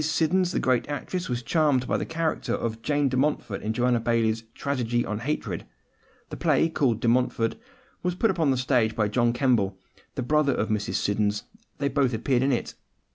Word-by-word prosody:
Siddons, 170 +3 +1
the - - 0
great 130 +1 +1
actress, 175 +4 -3
was 120 -1 -2
charmed 145 -4 +2
by - - +1
the - - -2
character 165 0 -1
of 115 -1 -3
Jane 145 +2 +1
de 130 - -1
Montfort 130 -6 0
in 110 - -2
Joanna 120 +1 +2
Baillie's 115 -1 +1
Tragedy 120 -4 -1
on 105 0 -3
Hatred. 145 +6 -3 0.7
The - - -5
play 165 - +2
called 125 -8 +1
De - - 0
Montfort 120 -1 +2 0.5
was 180 0 -1
put 220 +3 +2
upon 165 -5 +1
the 130 - +2
stage 125 -4 +1
by 110 -2 +1
John 120 +2 +2
Kemble, 120 -7 +1 0.4
the 130 - -2
brother 150 +1 +2
of 110 - -1
Mrs. 105 -1 -1
Siddons: 105 0 0 0.3
they 140 - 0
both 135 -3 +1
appeared 120 +2 +1
in 135 +1 +2
it. 120 - -2
125 Hz, 190 wpm, -26 LUFS, 115-145 Hz, 0.7 s, charmed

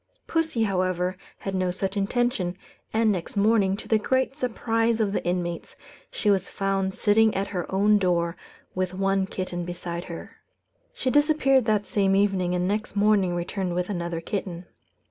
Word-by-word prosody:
Pussy, 320 -8 0
however, 185 -2 0 0.2
had 195 - -5
no 185 -1 0
such 190 +2 -3
intention; 200 -3 0 0.3
and 220 0 +3
next 185 +1 -4
morning, 200 -2 +3
to - - -10
the 220 - +3
great 260 +4 0
surprise 230 -3 0
of 205 -3 +1
the - - -1
inmates, 175 -1 -3 0.3
she 210 - +1
was 195 -1 +1
found 195 -1 -1
sitting 220 +1 +3
at 195 +1 -1
her 180 -4 -4
own 205 +2 +4
door 170 -2 +1 0.4
with 185 0 -2
one 195 0 +1
kitten 180 -2 -4
beside 175 0 -5
her. 170 -2 -9 0.6
She 260 - -1
disappeared 290 -3 +4
that 210 -2 +1
same 195 -2 +2
evening, 195 -3 +2
and 180 0 0
next 210 +1 -2
morning 200 -3 +3
returned 175 +1 -2
with 180 +3 -1
another 170 -3 -3
kitten. 180 -1 -4
195 Hz, 165 wpm, -25 LUFS, 180-215 Hz, 0.6 s, own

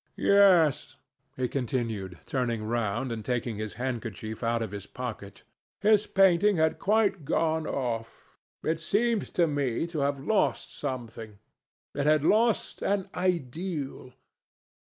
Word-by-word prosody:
"Yes," 185 -7 +4 0.4
he 130 -1 0
continued, 115 -8 -3
turning 120 -4 -1
round 115 +2 -1
and 110 -2 -4
taking 120 -1 -2
his 110 0 -4
handkerchief 115 -3 -4
out 115 -1 0
of 110 - -5
his 100 -1 -7
pocket; 110 -5 -7 0.4
"his 210 +1 +4
painting 195 +1 +4
had 160 0 +2
quite 205 -4 +2
gone 160 +2 0
off. 115 -4 -4 0.2
It 160 0 0
seemed 215 +6 0
to 175 - +4
me 145 -3 -1
to 170 -2 -4
have 140 0 0
lost 200 +10 0
something. 115 -4 -6 0.6
It 140 +1 -1
had 155 -1 +4
lost 225 +3 +2
an 195 -1 -1
ideal. 165 -5 -3
135 Hz, 130 wpm, -28 LUFS, 115-175 Hz, 0.6 s, Yes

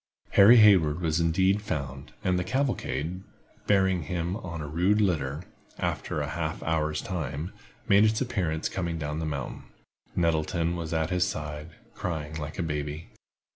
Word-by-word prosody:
Harry 110 +5 +8
Hayward 90 -8 +6
was 80 -2 0
indeed 95 +5 +2
found, 70 -8 -5
and 90 -1 +2
the - - 0
cavalcade, 95 - -1 0.5
bearing 95 -3 +3
him 85 +3 -2
on 85 -7 -6
a 75 - -5
rude 90 +8 +2
litter, 80 -6 0 0.3
after - - -2
a - - -3
half - - -3
hour's 80 -1 0
time, 80 -2 -4 0.3
made 100 +1 +6
its 110 0 +3
appearance 85 -11 -1
coming 85 -3 -3
down 75 0 -3
the 80 - -2
mountain. 70 -4 -4 0.5
Nettleton 85 0 +1
was 85 -2 -4
at 80 +1 0
his 90 0 +2
side, 75 +1 -6 0.2
crying 80 -3 -4
like 75 0 -6
a 90 - -1
baby. 75 0 -4
85 Hz, 155 wpm, -27 LUFS, 75-95 Hz, 0.5 s, Harry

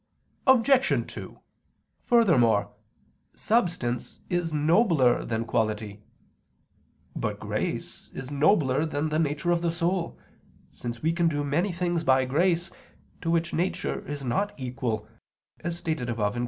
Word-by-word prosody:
Obj. 265 +1 +4
2: - - -9 0.7
Furthermore, 130 - +4 0.6
substance 170 - -1
is 175 -2 0
nobler 155 - +3
than 115 0 -2
quality. 110 -2 -1 1.1
But - - -3
grace - - -4
is 135 +1 -7
nobler 145 -2 +3
than 155 0 -1
the 155 +1 0
nature 155 +3 0
of 170 -1 +2
the 170 -1 +1
soul, 170 +1 -1 0.5
since 120 +1 -7
we 160 +1 +2
can 170 0 +2
do 145 -2 0
many 165 +8 0
things 175 -1 -1
by 130 -3 +4
grace, 170 +6 +1 0.5
to 165 - -2
which 170 0 +1
nature 180 +3 -1
is 145 -1 -5
not 195 +12 0
equal, 125 -4 -3 0.5
as 170 +1 -4
stated 155 -8 -3
above 105 -3 0
(Q. 120 - -4
155 Hz, 130 wpm, -27 LUFS, 125-175 Hz, 1.1 s, Obj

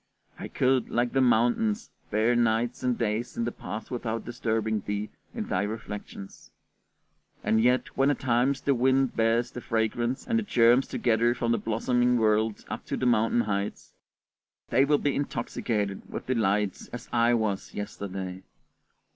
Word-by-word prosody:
I - - -5
could, 130 0 +1
like 120 0 0
the 135 - +3
mountains, 130 - +2 0.2
bear 110 +3 +2
nights 120 +1 +1
and 125 -2 0
days 115 +1 -2
in 115 - 0
the 120 - -1
past 110 -1 -7
without 115 -2 -3
disturbing 110 -2 -1
thee 105 +1 -3 0.2
in - - -3
thy 90 - 0
reflections! 105 -2 -7 0.9
And 110 0 +2
yet 125 +1 +1
when 135 +1 +3
at 145 - 0
times 130 +2 +1
the 140 - +2
wind 130 +1 +2
bears 115 +1 +2
the 125 - -7
fragrance 120 +3 -1
and 230 -1 +1
the - - -2
germs 120 - +4
together 120 0 +1
from 120 -1 -1
the 115 - +2
blossoming 120 +3 +1
world 110 -1 +1
up - - -5
to - - -2
the - - -1
mountain 115 0 +3
heights, 100 -2 -3 0.8
they 130 +4 +4
will 145 +1 +3
be 145 -1 0
intoxicated 110 -7 -2
with - - -5
delight 105 -5 0
as 120 - -7
I 120 0 +4
was 110 -4 -2
yesterday. 95 -2 -5
115 Hz, 160 wpm, -27 LUFS, 110-125 Hz, 0.9 s, germs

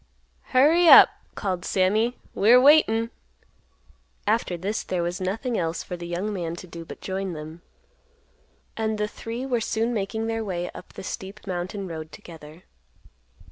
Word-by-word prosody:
"Hurry 320 +7 +4
up," - - +10 0.3
called 185 -3 -3
Sammy, 215 +6 +1 0.2
"we're 235 +5 +6
waitin'." 245 -5 +5 1.1
After 210 -4 0
this 200 +5 -2
there 180 -2 -2
was 175 +2 -3
nothing 225 +6 -2
else 165 0 -2
for 180 - -6
the 175 0 -7
young 185 +5 -3
man 170 -3 -3
to 175 - -9
do 170 -1 -9
but - - -11
join 190 -1 -3
them. 155 +2 -9 1.1
And 220 -1 -1
the 210 0 -1
three 230 +4 -6
were 245 -3 0
soon 225 +2 -1
making 220 +1 -2
their 225 0 -2
way 180 -3 -4
up - - -12
the - - -9
steep 195 +2 -7
mountain 190 +2 -4
road 160 -2 -7
together. 160 0 -13
195 Hz, 155 wpm, -25 LUFS, 175-225 Hz, 1.1 s, up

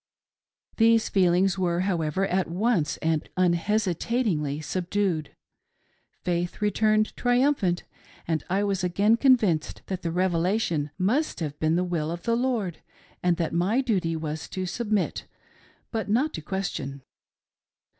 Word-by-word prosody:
These 225 0 +4
feelings 190 0 +3
were, 175 -1 +1
however, 180 -1 0
at 190 -1 0
once 185 -3 +1
and 160 -1 0
un 180 -2 +4
hesitatingly 180 - 0
subdued; 175 -1 -2 0.9
Faith 175 0 -1
returned 215 +1 +2
triumphant 245 -8 +2 0.4
and 160 -3 0
I 195 +3 +1
was 195 -2 -1
again 200 +5 +3
convinced 230 - +2
that 190 -1 -4
the 165 - -2
Revelation 175 -2 0
must 240 +12 0
have 150 -3 -4
been 155 +1 +2
the 180 - +2
will 170 -4 -2
of 170 +1 -5
the 230 -1 +1
Lord, 235 -8 -1 0.4
and 175 -1 +2
that 165 -2 -1
my 185 +9 +2
duty 190 -11 0
was 155 -1 -4
to 185 -1 -3
submit 210 +1 -1 0.6
but 220 -2 -3
not 265 +9 +2
to - - -5
ques 190 +4 -2
tion. 135 -1 -6
185 Hz, 135 wpm, -26 LUFS, 170-215 Hz, 0.9 s, These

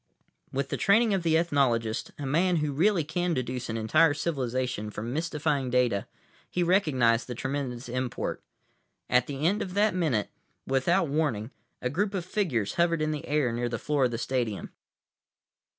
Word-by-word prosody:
With 135 +1 -2
the - - -2
training 220 +2 +4
of 190 - +1
the 165 -1 +3
ethnologist, 125 -9 +1
a 145 - -5
man 170 +7 +2
who 150 -2 0
really 170 +4 +2
can 170 +3 -1
deduce 125 -1 -3
an 110 - -2
entire 145 +8 +4
civilization 130 -7 -2
from 110 +3 -5
mystifying 150 -4 -1
data, 125 -5 +1 0.4
he 180 - 0
recognized 135 - +3
the 125 - -5
tremendous 130 -1 -3
import. 125 0 -3 0.7
At 125 0 +4
the 140 +1 -3
end 205 +5 +2
of 185 0 -5
that 210 +1 +3
minute, 150 - 0 0.3
without 165 +7 +2
warning, 140 -6 -1 0.3
a 125 - +1
group 200 +6 0
of 180 -3 -2
figures 155 - -1
hovered 170 -2 +2
in 155 - 0
the 150 -2 -5
air 145 -4 +1
near 120 +1 -1
the 115 - -2
floor 145 +2 +1
of - - +2
the 115 - -3
stadium. 120 -4 -2
140 Hz, 170 wpm, -28 LUFS, 125-170 Hz, 0.7 s, training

